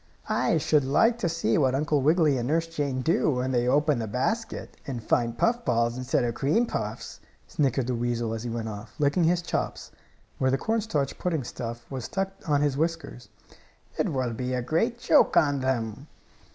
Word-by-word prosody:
"I - - +2
should 150 -2 +2
like 225 - +3
to 175 - 0
see 160 -8 +1
what 130 -3 +2
Uncle 150 0 +1
Wiggily 155 -2 +3
and 120 - -2
Nurse 165 +3 +1
Jane 145 -5 -2
do 165 +1 +2
when 130 -2 0
they 120 -1 +1
open 145 0 +2
the 110 - -3
basket, 215 - -2
and 125 -5 -4
find 115 +1 0
puff 235 - +1
balls 115 -1 +1
instead 125 0 0
of 120 -1 -1
cream 150 - +1
puffs," - - -5 0.3
snickered 135 -3 0
the 125 - -1
weasel 120 -1 -1
as 110 - -4
he 120 - -4
went 115 -1 -3
off, 105 +1 -8
licking 150 +3 +2
his 175 +1 +2
chops, - - -3 0.5
where 130 - +2
the 135 - +2
cornstarch 210 -9 -1
pudding 165 -6 -1
stuff 120 -1 -6
was 130 -4 -4
stuck 195 0 -2 0.2
on 145 -1 +3
his 145 -2 +1
whiskers. 160 -6 -3 0.7
"It - - 0
will 130 -4 -1
be 125 +3 -2
a 125 - -2
great 225 - 0
joke 290 +4 +4
on 145 -2 +3
them!" 130 0 -2
135 Hz, 190 wpm, -26 LUFS, 120-160 Hz, 0.7 s, joke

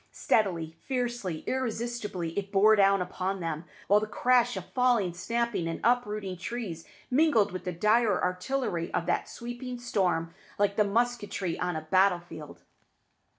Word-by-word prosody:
Steadily, 175 -7 0
fiercely, 240 - -2
irresistibly 230 -8 -3
it 200 -1 -3
bore 210 +2 +6
down 195 -2 +4
upon 190 +2 -3
them, 165 -1 -4 0.2
while 205 +1 +5
the 215 - -3
crash 245 +2 +2
of - - -6
falling, 240 -8 +2
snapping, 210 0 -1
and 165 - -3
uprooting 210 -6 0
trees 190 -4 -5 0.2
mingled 250 -7 +4
with 185 - -6
the 180 - -1
dire 210 +6 +3
artillery 180 -1 -2
of 170 - 0
that - - -1
sweeping 240 +1 -6
storm 180 -8 0 0.2
like 200 0 +2
the 210 - +4
musketry 205 -4 -1
on 180 -1 -1
a 155 - -2
battle 185 +3 +3
field. 160 -4 -11
200 Hz, 150 wpm, -28 LUFS, 180-240 Hz, 0.2 s, bore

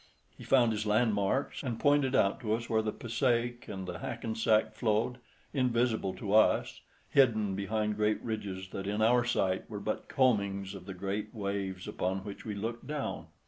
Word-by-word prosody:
He - - -12
found 120 -4 +4
his 105 0 -2
landmarks, 105 +3 +1
and 120 -5 -3
pointed 145 -3 +3
out 100 -4 +3
to 110 -3 -1
us 115 0 -5
where 110 -1 +2
the 110 0 -1
Passaic 120 +1 -1
and 95 -3 -5
the 90 -2 -5
Hackensack 110 -1 0
flowed, 110 +3 0 0.3
invisible 120 -7 +1
to 100 +2 -3
us, 110 0 +3 0.3
hidden 110 -7 +4
behind 105 +1 -1
great 105 0 +2
ridges 100 -4 -4
that 95 0 -5
in 105 +2 0
our 120 +2 +5
sight 95 -6 0
were 105 -2 -5
but 110 +2 -3
combings 100 -7 +1
of 95 -1 -10
the 95 - -6
green 100 +3 -3
waves 100 -3 -3
upon 95 +1 -2
which 100 0 -8
we 105 -2 -3
looked 115 +3 -4
down. 150 -1 -4
110 Hz, 175 wpm, -31 LUFS, 100-120 Hz, 0.3 s, our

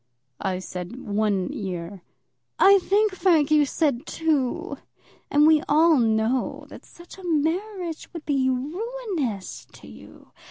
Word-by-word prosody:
"I 190 -1 -1
said 180 +2 -7
one 205 -4 -1
year." 185 -1 -6 0.6
"I 395 0 +6
think, 410 +2 +1
Frank, 330 -6 +2
you 300 -2 +4
said 275 -5 -1
two. 300 -6 -1 0.5
And 295 +1 +4
we 310 -1 +5
all 315 0 +5
know 225 +2 0
that - - -12
such 345 +2 -15
a - - -12
marriage 345 +2 -2
would 335 -3 -9
be 270 -3 +1
ruinous 310 - -4
to - - -14
you. 70 0 -15
295 Hz, 130 wpm, -24 LUFS, 220-345 Hz, 0.6 s, I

